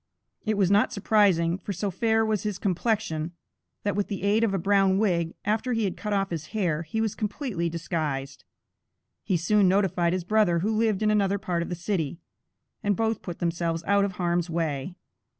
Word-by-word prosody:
It 215 -1 +1
was 195 -2 +3
not 205 +1 +4
surprising, 190 -5 +2
for 200 +2 -5
so 200 +2 -2
fair 225 +4 +2
was 215 -2 0
his 210 -3 -3
complexion, 185 -4 -1 0.5
that 205 -1 0
with 205 -1 0
the 195 -2 -5
aid 210 +3 +3
of 225 - +2
a 195 - 0
brown 195 +1 +3
wig, 170 -5 +1
after 225 +5 0
he 225 -1 0
had 195 - -1
cut 210 - -5
off 195 -2 0
his 160 -2 -4
hair, 170 -6 +1
he 170 +7 -4
was 220 -2 0
completely 205 - -2
disguised. 155 -5 -3 0.8
He 185 - +1
soon 200 +4 +3
notified 185 -3 +2
his 185 -1 -1
brother, 205 -2 +3
who 215 +4 0
lived 220 -2 +1
in 215 - +3
another 200 -1 +2
part 180 -3 -2
of 170 - -4
the 175 - -2
city, 170 -3 -2 0.6
and 205 -1 +1
both 225 0 0
put 175 -2 -6
themselves 170 -1 -1
out 200 0 +3
of 200 -1 -1
harm's 175 -1 0
way. 160 -1 -2
195 Hz, 195 wpm, -26 LUFS, 170-210 Hz, 0.8 s, not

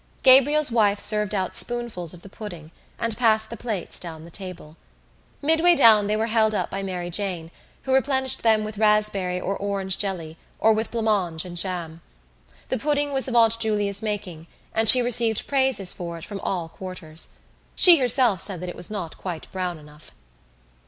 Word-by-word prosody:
Gabriel's 275 +2 +6
wife 210 -3 +2
served 210 -1 +1
out 185 -2 -2
spoonfuls 235 -9 -3
of 175 -1 -12
the - - -11
pudding 175 -6 -10 0.3
and 230 -1 -3
passed 220 -2 +2
the - - -5
plates 215 -5 -5
down 160 -2 -8
the 170 - -14
table. 180 -5 -8 0.7
Midway 325 +3 +4
down 220 -7 +5
they 210 +1 0
were 220 - 0
held 220 -1 +1
up - - -2
by 195 - -4
Mary 180 -2 -5
Jane, 175 -4 -3 0.3
who 265 - -2
replenished 265 -1 0
them 220 -2 +2
with 215 -1 -7
raspberry 210 -4 +1
or 195 +2 -3
orange 195 -2 -2
jelly 170 -5 -3 0.2
or 220 0 +3
with 220 +1 -2
blancmange 205 -8 -1
and 175 -1 -9
jam. 170 -2 -3 0.7
The - - -1
pudding 290 +2 0
was 270 0 -1
of 245 - -3
Aunt 230 -1 +4
Julia's 205 -3 -1
making 195 -7 -5 0.3
and 225 -1 +2
she 250 -1 +8
received 235 -2 +2
praises 265 -9 +2
for 170 -1 -7
it 165 - -10
from 200 -2 -7
all 180 -3 -3
quarters. 165 -3 -7 0.5
She 350 -2 +9
herself 245 -7 +3
said 190 -4 -1
that 180 - -5
it - - -8
was 175 - -4
not 190 -6 -6
quite 175 -4 -6
brown 180 -2 -4
enough. 150 0 -16
205 Hz, 180 wpm, -23 LUFS, 180-230 Hz, 0.7 s, She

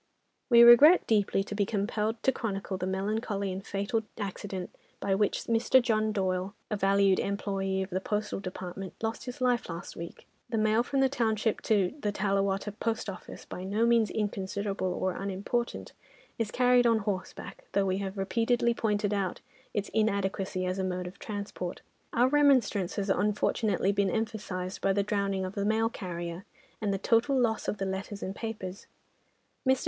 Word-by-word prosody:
"We 235 -1 +8
regret 280 +9 +9
deeply 205 -3 +2
to 205 - -7
be 205 0 +1
compelled 215 +2 -1
to 265 - +4
chronicle 200 -5 -3
the 185 0 -3
melancholy 200 +1 -1
and 190 +1 -5
fatal 200 +3 -1 0.2
accident 195 -2 -5 0.3
by 195 - 0
which 205 +1 +1
Mr. 230 +3 +4
John 220 -3 +1
Doyle, 190 -1 -1 0.2
a - - +1
valued 195 -1 +3
employé 195 -1 -1
of 190 - -9
the 185 +1 -1
Postal 210 +1 -2
Department, 185 0 -6
lost 225 0 -2
his 250 0 -7
life 245 -4 +1
last 165 0 -6
week. 170 0 -8 0.2
"The 230 - -1
mail 215 +1 +3
from 270 +2 0
the 270 - +5
township 225 -4 0
to 200 -3 +3
the 210 -6 -1
Tallawatta 195 0 0
Post 225 -3 -1
Office, 185 - -10
by 180 - -7
no 205 +4 +1
means 235 -2 +4
inconsiderable 200 -2 -2
or 185 +1 -1
unimportant, 200 +6 -3 0.5
is 225 -2 0
carried 245 +1 +4
on 230 -1 +4
horseback, 200 -3 -5
though 200 0 +2
we 190 0 0
have 195 0 -4
repeatedly 235 +4 +1
pointed 210 -2 0
out 195 -3 -1 0.3
its 205 -1 -2
inadequacy 195 -3 0
as 185 +1 -2
a - - 0
mode 180 -1 -2
of 180 - -9
transport. 200 -4 -5 0.3
Our 245 +2 +4
remonstrance 260 -10 +3
has 200 -1 0
unfortunately 205 0 +1
been 200 -1 +1
emphasised 200 -4 -3
by 195 - +2
the 200 0 +1
drowning 200 -2 -1
of 185 - -5
the 200 - -2
mail 220 +2 +2
carrier, 175 -4 -5 0.4
and 210 -2 0
the 195 - 0
total 235 +7 +2
loss 225 -3 +1
of 210 - -1
the 195 - -2
letters 195 +2 -4
and 190 - -4
papers. 205 -5 -6 0.8
Mr. 260 -2 +3
200 Hz, 175 wpm, -29 LUFS, 190-225 Hz, 0.8 s, regret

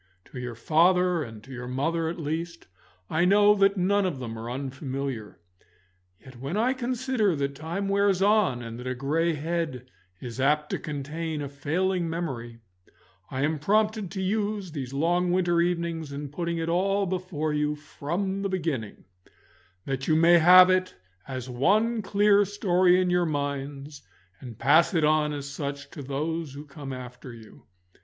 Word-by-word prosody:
To 125 - -6
your 125 -1 -5
father 175 +6 +3
and 110 -6 -8
to 135 - -13
your 125 -1 -6
mother, 160 +6 -1
at 170 - -5
least, 165 +2 -4 0.4
I 160 +2 +1
know 205 +3 +6
that 200 0 +3
none 200 +3 +2
of 180 -7 -1
them 120 -3 -6
are 115 +1 -6
unfamiliar. 135 - -5 0.8
Yet 130 -2 -14
when 140 +9 -3
I 245 +4 +2
consider 250 -6 0
that 140 -1 -2
time 165 +7 -4
wears 200 -1 +2
on, 195 - +2
and 115 0 -7
that 125 - -7
a 130 - -2
grey 160 +6 0
head 155 -4 -3 0.3
is 120 0 -7
apt 150 +2 +2
to - - -1
contain 155 +2 -4
a 145 - -3
failing 170 +5 -1
memory, 120 -9 -5 0.7
I 135 0 -2
am 155 +1 0
prompted 210 +4 +1
to 190 - -3
use 205 -1 -1
these 135 -5 -5
long 175 +5 +1
winter 175 -2 +2
evenings 170 -3 -2
in 145 0 -5
putting 170 +3 -3
it 165 0 -2
all 195 +4 +1
before 175 -5 -2
you 150 0 0
from 175 +6 -4
the 200 - -1
beginning, 155 - -3 0.8
that 135 -1 -3
you 155 - +3
may 170 +2 +6
have 180 +2 +8
it 185 0 0 0.3
as 130 -2 -5
one 215 - +2
clear 205 0 +4
story 185 -2 +3
in 180 -1 +1
your 175 -1 +2
minds, 140 -1 -4 0.4
and 120 -4 -10
pass 155 - +4
it 160 - +2
on 150 0 +3
as 140 -1 -5
such 140 0 -5
to 145 - -8
those 145 +2 -3
who 145 +2 -8
come 140 -1 -8
after 125 0 -8
you. 110 -2 -15
160 Hz, 170 wpm, -26 LUFS, 140-185 Hz, 0.8 s, have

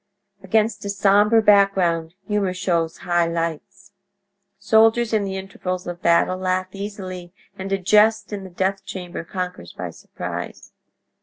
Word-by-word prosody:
Against 210 +2 0
a 200 - -4
sombre 205 +3 +4
background 190 -5 +3
humor 200 -3 0
shows 170 -3 -1
high 175 -1 +2
lights. 165 -2 -4 0.7
Soldiers 225 +1 +3
in 210 -2 +2
the 190 0 -4
intervals 185 -1 -5
of 175 0 -6
battle 170 +2 +3
laugh 185 0 -1
easily, 190 -3 -7 0.2
and 190 +1 -6
a 195 - +2
jest 210 +3 +3
in 200 -1 -4
the 190 - -9
death 190 +2 -1
chamber 180 -2 -6
conquers 180 - -6
by - - -6
surprise. - - -7
190 Hz, 140 wpm, -22 LUFS, 180-205 Hz, 0.7 s, sombre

